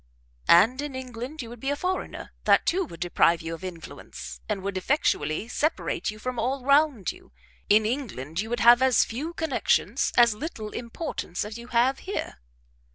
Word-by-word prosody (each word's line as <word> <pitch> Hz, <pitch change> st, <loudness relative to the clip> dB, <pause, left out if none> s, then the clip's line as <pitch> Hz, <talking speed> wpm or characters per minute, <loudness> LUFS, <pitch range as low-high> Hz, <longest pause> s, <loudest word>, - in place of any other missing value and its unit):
"And 225 Hz, +11 st, +6 dB
in 290 Hz, -2 st, -5 dB
England 255 Hz, +3 st, -6 dB
you 230 Hz, -, -9 dB
would 240 Hz, 0 st, -10 dB
be 270 Hz, -, -2 dB
a 285 Hz, -, +1 dB
foreigner; 365 Hz, +5 st, -4 dB
that -, -, +5 dB
too 370 Hz, +2 st, +1 dB
would 170 Hz, -, -11 dB
deprive 170 Hz, -1 st, +2 dB
you 165 Hz, 0 st, -4 dB
of 165 Hz, -, -8 dB
influence, 65 Hz, -, -8 dB
and 195 Hz, -, -2 dB
would 200 Hz, 0 st, -3 dB
effectually 200 Hz, -, 0 dB
separate 305 Hz, +6 st, -1 dB
you 215 Hz, -, -6 dB
from 250 Hz, +2 st, -4 dB
all 255 Hz, +2 st, -1 dB
round 280 Hz, -, +3 dB
you; -, -, -17 dB, 0.4 s
in 215 Hz, +1 st, +5 dB
England 195 Hz, -, -3 dB
you 220 Hz, -, -6 dB
would 240 Hz, +1 st, -2 dB
have 240 Hz, +1 st, +7 dB
as 260 Hz, -2 st, +4 dB
few 280 Hz, +9 st, -4 dB
connections, 320 Hz, -4 st, +1 dB
as 235 Hz, -2 st, +6 dB
little 215 Hz, -3 st, -6 dB
importance 235 Hz, -, -4 dB
as 215 Hz, +2 st, -7 dB
you 235 Hz, -, -10 dB
have 250 Hz, +2 st, +2 dB
here." 380 Hz, -, -5 dB
240 Hz, 180 wpm, -26 LUFS, 195-275 Hz, 0.4 s, have